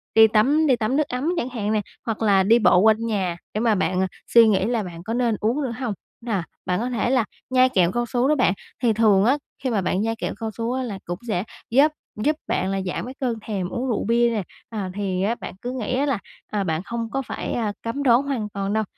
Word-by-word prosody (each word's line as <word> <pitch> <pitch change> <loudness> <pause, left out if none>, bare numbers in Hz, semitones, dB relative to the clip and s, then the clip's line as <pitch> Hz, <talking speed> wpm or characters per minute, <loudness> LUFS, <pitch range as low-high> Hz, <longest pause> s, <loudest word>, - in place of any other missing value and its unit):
đi 220 0 +9
tắm 275 +9 +3
đi 260 - +5
tắm 230 +2 -1
nước 300 -1 +1
ấm 255 +5 -2
chẳng 250 - -1
hạn 215 -4 -2
nè, 215 - +2 0.2
hoặc 225 -2 -3
là 200 -3 +4
đi 225 +5 +5
bộ 185 -4 +5
quanh 220 +3 +4
nhà 190 -6 -1 0.2
để 215 - -1
mà 225 -2 +3
bạn, 185 -1 0
à, 190 - +1 0.2
suy 230 -1 +7
nghĩ 195 -3 +3
là 230 -1 0
bạn 170 -2 -8
có 220 +4 -3
nên 240 -2 +1
uống 235 +7 +1
nữa 255 - -2
hông? 245 -5 -2 0.3
Nà 220 -7 -1 0.2
bạn 180 0 0
có 240 +3 -1
thể 240 -1 0
là 255 -3 +3 0.2
nhai 255 0 +5 0.2
cao 240 0 0
su 245 +2 +1
đó 305 - +3
bạn. 250 -8 +3 0.3
Thì 230 -2 +4
thường 210 -3 +4
á 265 +5 +4 0.3
khi 260 - 0
mà 215 -5 +1
bạn 185 +1 0
nhai 225 +1 0
kẹo 225 - -3
cao 225 -1 -2
su 230 +1 -1
á 260 0 -1
là 210 -6 -5
cũng 175 +1 -4
sẽ 185 -5 0 0.3
giúp 280 +6 +5 0.2
giúp 295 +9 +1
bạn 190 +1 0
là 195 0 -1
giảm 180 - -3
cái 255 - -7
cơn 250 -4 0
thèm 195 -5 -2
uống 250 +5 -3
rượu 235 - 0
bia 235 +2 +3
nè, 220 -4 -1 0.3
à, 205 -4 -4
thì 190 -2 -2
á 220 +4 +1
bạn - - -8
cứ 245 - -3
nghĩ 255 -2 -3
á 280 - +2
là, 275 -7 0 0.3
à, 205 -2 -1
bạn 160 -2 -1
không 230 +1 -4
có 270 - -1
phải, 265 - -5
à, 215 -3 -1
cấm 230 +5 -3
đoán 245 -1 +5
hoàn 265 -7 -3
toàn 200 0 -3
đâu 220 0 +2
225 Hz, 260 wpm, -23 LUFS, 200-245 Hz, 0.3 s, đi